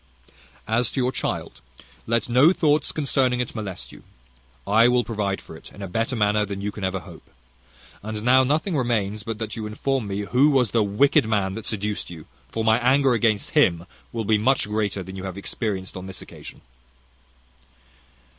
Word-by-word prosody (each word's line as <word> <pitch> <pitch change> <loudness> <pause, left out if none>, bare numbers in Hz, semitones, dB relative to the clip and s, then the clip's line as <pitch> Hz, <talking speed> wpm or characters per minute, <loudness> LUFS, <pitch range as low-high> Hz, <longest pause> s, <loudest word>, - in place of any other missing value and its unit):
"As 120 +1 +1
to - - -4
your 125 0 +1
child, - - -4 0.5
let 115 -1 +1
no 130 +7 +5
thoughts 150 -4 +2
concerning 135 -4 +1
it 125 - -2
molest 105 -5 -6
you; - - -14 0.6
I 110 +4 +5
will 125 0 +3
provide 105 -4 -2
for - - -12
it - - -13
in 100 - -10
a - - -4
better 115 +7 -1
manner 105 -1 +2
than 100 -1 -5
you 105 +1 -3
can 105 0 -8
ever 95 0 -1
hope. 85 -4 -14 0.7
And 105 0 -5
now 130 +2 +5
nothing 155 +7 0
remains 110 -6 0
but 110 +1 -5
that 110 -1 -5
you 110 -1 -4
inform 125 +2 -2
me 100 +1 -3
who 125 +8 +3
was 130 -6 +2
the 115 - +3
wicked 105 +4 +3
man 100 -3 0
that 110 +1 -6
seduced 105 -1 -3
you; 80 -3 -10 0.2
for 110 - -3
my 110 +1 +4
anger 130 +1 +3
against 110 -3 +1
him 85 -1 +3 0.3
will 115 -2 -3
be 110 0 +3
much 130 +1 +2
greater 105 -2 -1
than 95 +2 -9
you 95 - -7
have 95 0 -6
experienced 100 -2 -4
on 95 0 -7
this 95 - -6
occasion." - - -12
110 Hz, 190 wpm, -24 LUFS, 100-125 Hz, 0.7 s, no